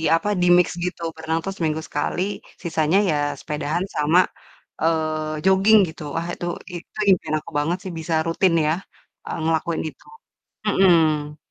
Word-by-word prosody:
apa, 185 - -2
di-mix 175 0 +5 0.2
gitu, 180 -1 -4
berenang 160 +1 -2
tuh 195 - -2
seminggu 160 -1 -1
sekali, 145 +4 -2 0.4
sisanya 160 +1 +1
ya 150 - +2 0.2
sepedaan 150 +3 -2
sama, 155 +4 +4 0.6
eee, 155 -1 0
joging, 195 +3 +6
gitu. 160 - -10 0.2
Wah 170 - -3
itu, 175 - -5 0.3
i - - -7
itu - - -16 0.2
impian 155 - -4
aku - - -12
banget 155 +4 +1
sih 185 - -4
bisa 160 0 -2
rutin 165 +2 +2
ya, 155 - +3 0.5
e - - -6
ngelakuin 165 +1 0
itu. - - -15 0.6
Mhm. 160 -7 +3
160 Hz, 150 wpm, -22 LUFS, 155-175 Hz, 0.6 s, joging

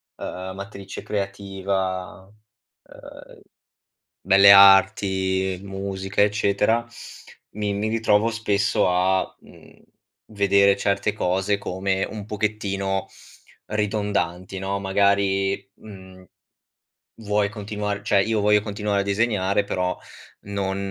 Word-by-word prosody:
ehm, 95 +1 -7
matrice 100 -1 -8
creativa, 95 -1 -4 0.6
ehm, - - -14 0.8
Belle 100 +1 +6
Arti, 95 -1 +5
musica, 95 0 -4
eccetera, 105 +2 +1 0.7
mi 105 -1 -3
mi 105 +2 -2
ritrovo 110 -1 +2
spesso 105 -4 0
a, 95 +1 0
mhmm, - - -19 0.5
vedere 100 -1 +3
certe 100 +1 0
cose 95 0 0
come 95 0 -2
un 105 -2 -7
pochettino 100 -2 -2 0.6
ridondanti, 100 -3 -2
no. 100 +1 -3
Magari, 100 0 +1
mhmm, 95 -3 -14 1.0
vuoi 105 -1 0
continuar 105 0 -4
cioè 100 -1 +2
io 110 +1 0
voglio 105 0 +4
continuare 105 -1 -2
a - - -2
disegnare, 100 -1 0
però 90 -2 -2 0.5
non 100 -1 -3
100 Hz, 100 wpm, -23 LUFS, 95-105 Hz, 1.0 s, Belle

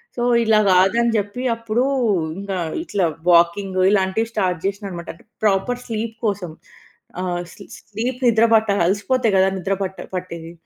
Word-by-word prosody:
So, 240 - -2 0.2
ఇలా 220 -1 +4
కాదని 195 +6 +3
జెప్పి, 205 +3 -2
అప్పుడు 230 +1 -1 0.6
ఇంకా 200 -1 -4 0.3
ఇట్లా, 205 - 0 0.2
వాకింగు 185 +2 +3
ఇలాంటివి 200 +2 +1
స్టార్ట్ 180 -5 0
చేసినా 200 +1 -2
అనమాట. 170 -2 -8
అంటే 165 - -21 0.2
ప్రాపర్ 210 +4 +1
స్లీప్ 225 0 -4
కోసం. 200 -5 -2 0.7
ఆహ్, 175 -1 -2
స్లీ - - -13
స్లీప్ 235 +4 -4
నిద్ర 230 -1 +4
పట్టా 220 -2 +3
అలసిపోతే 205 +7 +1
కదా! 190 0 +4
నిద్ర 190 +1 -1
పట్ట 190 0 -3 0.2
పట్టేది. 170 -2 -6
200 Hz, 145 wpm, -20 LUFS, 185-225 Hz, 0.7 s, ఇలా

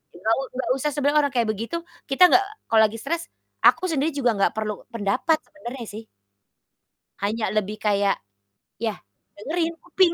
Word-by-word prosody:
Nggak 220 +6 +1
u - - 0 0.2
nggak 260 - -2
usah 300 +3 0
sebenarnya 290 +1 +2
orang 280 - -10
kayak 235 -2 +2
begitu, 230 +10 -4 0.3
kita 270 +7 +5
nggak, 390 - +6
eee, 425 +2 -12
kalau 220 -1 +6
lagi 215 +1 -3
stres 335 +8 -2 0.4
aku - - +5
sendiri 300 0 +1
juga 250 -4 +2
nggak 195 - +2
perlu 215 -1 -3
pendapat 230 +8 +1
sebenarnya 260 -5 -8
sih. 215 +2 -8 1.2
Hanya 215 +2 0
lebih 210 0 0
kayak, 200 -1 +3 0.7
ya, 220 -3 -1 0.4
dengerin, 325 +9 -1
kuping. 355 0 +3
240 Hz, 165 wpm, -24 LUFS, 215-305 Hz, 1.2 s, nggak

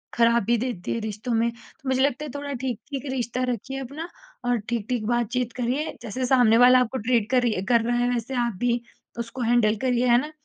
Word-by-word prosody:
ख़राबी 235 0 +3
देती 235 -7 -3
है 230 - -2
रिश्तों 215 +3 -4
में, 230 +1 +2
तो 240 +3 -11
मुझे 260 0 +2
लगता 280 +2 +1
है - - -6
थोड़ा 285 0 -4
ठीक-ठीक 265 +2 -4
रिश्ता 250 0 -2
रखिए 265 +4 -5
अपना 285 +6 -6 0.4
और 245 - +3
ठीक-ठीक 235 0 -2
बातचीत 240 0 0
करिए। 255 +5 -1
जैसे 245 +3 -3
सामने 245 -3 +5
वाला 250 +1 +7
आपको 250 +1 0
ट्रीट 230 -2 +1
कर 255 - +4
रही 215 -6 0
कर 235 -1 +5
रहा 240 - +1
है 245 0 +1
वैसे 245 +2 -2
आप 235 - -2
भी 240 -1 +1 0.4
उसको 235 +2 -5
हैंडल 230 -2 +3
करिए, 250 0 +2
है 240 0 +6
ना? 300 +2 -7
240 Hz, 205 wpm, -25 LUFS, 230-255 Hz, 0.4 s, वाला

